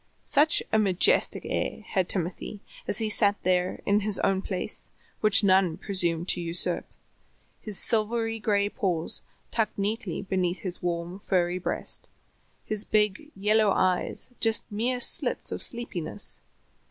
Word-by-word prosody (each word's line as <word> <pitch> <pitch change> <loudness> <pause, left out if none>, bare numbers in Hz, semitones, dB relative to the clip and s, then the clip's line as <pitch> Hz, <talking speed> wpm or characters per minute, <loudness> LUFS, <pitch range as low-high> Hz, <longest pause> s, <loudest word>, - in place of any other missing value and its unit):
Such 300 +2 +5
a 220 - +5
majestic 205 - +2
air - - -2
had 185 -2 -1
Timothy 185 +3 -2 0.3
as - - 0
he 220 -1 +2
sat 205 -1 +4
there 180 0 0
in 200 +1 +3
his 210 -1 0
own 190 -1 +2
place, 185 -2 -4 0.3
which 215 0 +5
none 190 -4 +3
presumed 175 -4 0
to 175 - +2
usurp; 170 +1 0 0.7
his 210 -3 -4
silvery 225 0 0
gray 205 -2 +1
paws 175 -5 -1 0.3
tucked 225 -2 0
neatly 205 -1 -2
beneath 185 -2 -1
his 185 -2 -4
warm 175 +1 -3
furry 180 -3 0
breast, - - -3 0.6
his 215 -1 0
big, 210 +7 +1
yellow 210 +2 +3
eyes 185 +6 0
just 225 -1 +2
mere 240 +4 -1
slits - - +1
of - - -4
sleepiness. 235 - -3
200 Hz, 140 wpm, -27 LUFS, 180-215 Hz, 0.7 s, Such